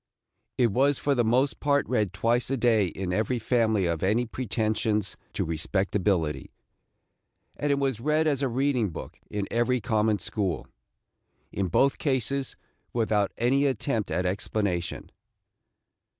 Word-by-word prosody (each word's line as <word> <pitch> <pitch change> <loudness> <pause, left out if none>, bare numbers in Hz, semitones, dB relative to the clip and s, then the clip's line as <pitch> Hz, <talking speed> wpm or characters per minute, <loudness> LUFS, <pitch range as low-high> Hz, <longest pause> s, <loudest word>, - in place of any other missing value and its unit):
It 120 -3 +3
was 135 +5 +3
for 145 - +1
the 120 -3 +2
most 125 +5 +2
part 145 -1 +2
read 105 -7 +1
twice 115 +6 +1
a 135 - 0
day 115 -5 +3
in 90 +1 -4
every 110 +5 0
family 110 -4 +1
of 85 -2 -1
any 110 +6 +2
pretensions 110 -3 -1 0.2
to - - -1
respectability, 90 0 0 1.1
and 145 0 -1
it 140 - +2
was 135 -5 0
read 155 +5 +1
as 145 -3 +1
a 135 - +2
reading 125 -3 +1
book 80 - -9
in 105 -1 -3
every 120 +2 +2
common 110 -2 +1
school, 100 -5 -3 0.5
– - - -46
in 95 -1 -1
both 135 +10 +2
cases 135 -1 -1 0.4
without 110 -4 +1
any 135 +4 +2
attempt 115 -4 -1
at 90 - -1
explanation. 90 -1 -2
115 Hz, 145 wpm, -27 LUFS, 100-130 Hz, 1.1 s, It